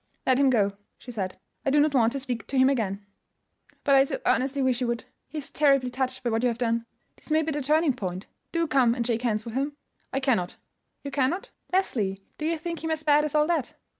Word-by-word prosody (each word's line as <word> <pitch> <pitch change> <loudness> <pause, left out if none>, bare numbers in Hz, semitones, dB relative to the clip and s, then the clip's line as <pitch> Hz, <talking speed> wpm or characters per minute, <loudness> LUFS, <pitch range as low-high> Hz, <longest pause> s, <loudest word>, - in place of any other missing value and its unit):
"Let 260 0 +4
him 275 -1 +5
go," 200 -5 +2 0.2
she 250 - -10
said. 190 -5 -4 0.3
"I - - +1
do 290 +2 +4
not 295 0 +3
want 235 -4 +4
to 275 - -2
speak 245 -4 -4
to 275 - -2
him 260 +1 +6
again." 205 -6 -2 0.8
"But 280 - +3
I 270 0 +7
so 275 - -3
earnestly 270 +1 +1
wish 255 -1 +1
you 250 - +1
would. 235 -1 -2 0.2
He 315 - -8
is 290 - -5
terribly 275 -4 +3
touched 260 0 -2
by 240 - 0
what 225 0 +1
you 250 - +3
have 235 -2 -1
done. 230 -1 0 0.3
This - - -15
may 310 +1 +3
be 320 - -2
the 295 0 -2
turning 305 +1 +3
point. 185 -4 -5 0.3
Do 335 0 +1
come 255 -5 +3
and 240 -2 -1
shake 235 -1 0
hands 220 -3 0
with 230 - -6
him." 280 +3 -2 0.3
"I 270 - 0
cannot." 230 -10 0 0.5
"You 280 - -5
cannot? 275 +7 0 0.2
Leslie, 210 - 0 0.2
do 305 - -1
you 330 0 0
think 335 +1 -5
him 320 - -1
as 315 -1 -1
bad 300 0 +4
as 300 - -3
all 300 0 +5
that?" 320 -5 -1
260 Hz, 245 wpm, -26 LUFS, 235-295 Hz, 0.8 s, I